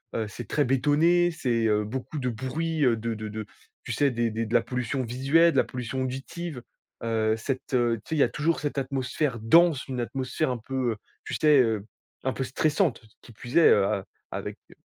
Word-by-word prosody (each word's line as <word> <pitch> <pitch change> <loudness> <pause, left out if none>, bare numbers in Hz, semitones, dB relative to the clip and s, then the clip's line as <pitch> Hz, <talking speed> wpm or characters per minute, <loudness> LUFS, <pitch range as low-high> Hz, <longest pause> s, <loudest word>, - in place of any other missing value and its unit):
Heu 110 -1 -1
c'est 115 +1 -8
très 145 - +1
bétonné, 150 +7 +3
c'est 120 -8 0
heu, 105 -1 +2
beaucoup 130 +7 -5
de 130 - -2
bruit, 145 +7 -2
heu, 120 -2 +4
de 115 +1 -3
de 110 0 -5
de, 110 0 -5 0.4
tu - - -5
sais 145 - +3
des 115 -1 0
des 115 +1 -2
de 110 - -6
la 120 - +5
pollution 125 +1 -2
visuelle 135 +8 +3
de - - -1
la - - +5
pollution 130 0 -4
auditive. 135 +2 -5 0.4
Heu, 110 -1 +1
cette, 130 +3 -4
heu, 120 -2 +2
tu 105 - -17
sais, 160 - -1
il - - 0
y - - +7
a - - +2
toujours 160 +2 0
cette 145 -1 -3
atmosphère 135 -1 -2
dense, 155 +6 +4
une 130 -2 -4
atmosphère 130 +4 -2
un 125 - -2
peu, 125 +1 -2
heu, - - -11 0.3
tu - - -5
sais 150 -2 +5
heu, 110 -4 0 0.4
un 130 - 0
peu 135 - -2
stressante 155 - +1 0.2
qui - - -15
plus 120 +3 -9
est, 170 - +8
heu, 100 - +5
a 100 -1 -1 0.3
avec, - - -5
heu - - -16
130 Hz, 220 wpm, -26 LUFS, 115-145 Hz, 0.4 s, est